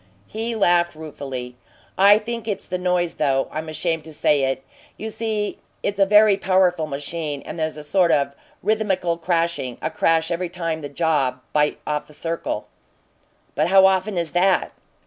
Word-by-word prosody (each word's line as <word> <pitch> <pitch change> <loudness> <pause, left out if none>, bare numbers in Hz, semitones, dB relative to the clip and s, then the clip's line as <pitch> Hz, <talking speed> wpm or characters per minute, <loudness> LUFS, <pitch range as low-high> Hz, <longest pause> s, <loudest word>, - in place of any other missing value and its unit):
He 225 +2 -4
laughed 175 -5 +3
ruefully. 135 -5 -7 0.4
"I 200 +2 +7
think 230 +1 -5
it's 205 -3 -2
the 180 - -3
noise, 180 -1 +1
though 135 -3 +1
I'm 155 +1 -5
ashamed 160 0 -1
to 160 - -9
say 145 -2 +2
it. 135 0 -2 0.3
You 220 0 -5
see, 215 -2 -2 0.2
it's 200 0 -2
a 195 - +5
very 210 0 +6
powerful 185 -4 +2
machine, 145 0 -4
and - - -7
there's 155 -1 -2
a 150 - -7
sort 175 +3 +2
of 140 -1 +2 0.3
rhythmical 190 -6 0
crashing 170 -7 -1
a - - -3
crash 165 +1 +2
every 170 +1 -2
time 165 -2 -3
the 145 - -6
jaws 145 -4 +1 0.2
bite 150 0 +2
off 150 0 -3
a - - -12
circle." 165 +2 -3 0.9
"How 190 +6 +5
often 190 +1 +2
is 170 -3 -1
that?" 185 +1 +2
170 Hz, 165 wpm, -22 LUFS, 150-190 Hz, 0.9 s, I